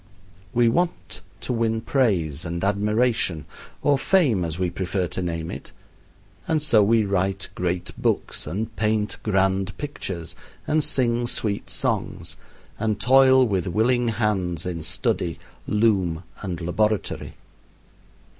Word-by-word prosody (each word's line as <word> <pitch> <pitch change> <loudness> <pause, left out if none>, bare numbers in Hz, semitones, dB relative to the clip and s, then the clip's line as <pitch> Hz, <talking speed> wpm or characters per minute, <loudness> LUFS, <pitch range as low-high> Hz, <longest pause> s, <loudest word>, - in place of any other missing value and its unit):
We 120 0 +3
want 170 +9 -1 0.2
to - - -2
win 115 -1 0
praise 90 - +1
and 85 0 -4
admiration 105 - +1 0.4
or 140 -2 +3
fame 135 - +3
as 80 -1 -3
we 90 -1 -1
prefer 95 0 -1
to 95 - -3
name 85 -2 -3
it - - -8 0.7
and 160 - +2
so 120 -8 +4
we 110 +1 +3
write 95 0 -1
great 90 0 -2
books, - - -1
and 110 +7 -4
paint 105 -2 0
grand 95 -1 +1
pictures, 95 - -5 0.3
and 155 0 +2
sing 120 -3 +1
sweet 105 -4 -2
songs; - - -2 0.4
and 110 -2 0
toil 130 +2 +6
with 95 -3 -1
willing 120 +7 +2
hands 95 -7 -1
in 85 -3 -3
study, 80 +2 -1 0.3
loom, 95 -6 +1 0.2
and 90 -3 -4
laboratory. 105 +5 -1
105 Hz, 125 wpm, -24 LUFS, 90-115 Hz, 0.7 s, toil